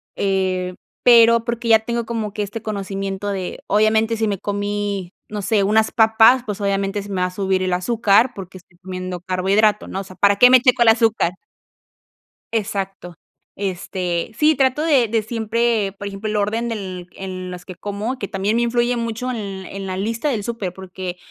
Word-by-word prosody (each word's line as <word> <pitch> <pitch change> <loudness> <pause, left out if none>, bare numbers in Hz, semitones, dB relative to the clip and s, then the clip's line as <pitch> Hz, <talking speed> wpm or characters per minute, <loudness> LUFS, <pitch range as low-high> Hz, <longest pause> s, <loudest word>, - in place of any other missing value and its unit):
eh, 185 -2 -1 0.3
pero 230 -1 +6
porque 235 0 -3
ya 220 -1 +7
tengo 235 +1 -3
como 220 -3 -3
que 210 - -2
este 205 +2 -6
conocimiento 195 -1 -4
de 190 -2 -4
obviamente 220 +2 +2
si 220 0 0
me 200 -3 -2
comí, 205 -2 -3 0.2
no 210 -1 -4
sé, 205 +1 +1
unas 220 +2 +2
papas, 225 +3 +5
pues 210 -1 -4
obviamente 200 0 -1
se 205 - -11
me 190 -2 -2
va 180 - +2
a - - -7
subir 190 0 0
el 185 -1 0
azúcar, 220 +4 +3
porque 185 -1 -9
estoy 175 -1 -20
comiendo 185 -1 -5
carbohidrato, 195 +4 +1
¿no? 190 - -4
O - - -7
sea, 185 -1 -13
¿para 200 +1 +3
qué 250 +4 +8
me 255 -1 +7
checo 255 -1 +3
el 230 - +6
azúcar? 225 -5 +2 1.2
Exacto. 195 -5 -3 0.4
Este, 180 -1 -3
sí 310 +1 +4
trato 265 +1 +1
de 280 -8 +3
de 225 0 +1
siempre, 225 -1 0
por 200 - -6
ejemplo, 200 +2 -4
el 215 - -1
orden 220 +3 0
del 185 -5 -5
en 185 -1 -6
las 180 0 -8
que 185 - -9
como, 205 +7 -4
que 200 - -4
también 200 +1 -1
me 235 - +2
influye 240 +1 +1
mucho 230 +2 -3
en 200 -5 -5
en 195 0 -7
la 185 -1 -4
lista 225 +8 -2
del 215 -6 -2
súper, 215 -6 -4
porque, 185 -1 -7
205 Hz, 190 wpm, -20 LUFS, 190-230 Hz, 1.2 s, qué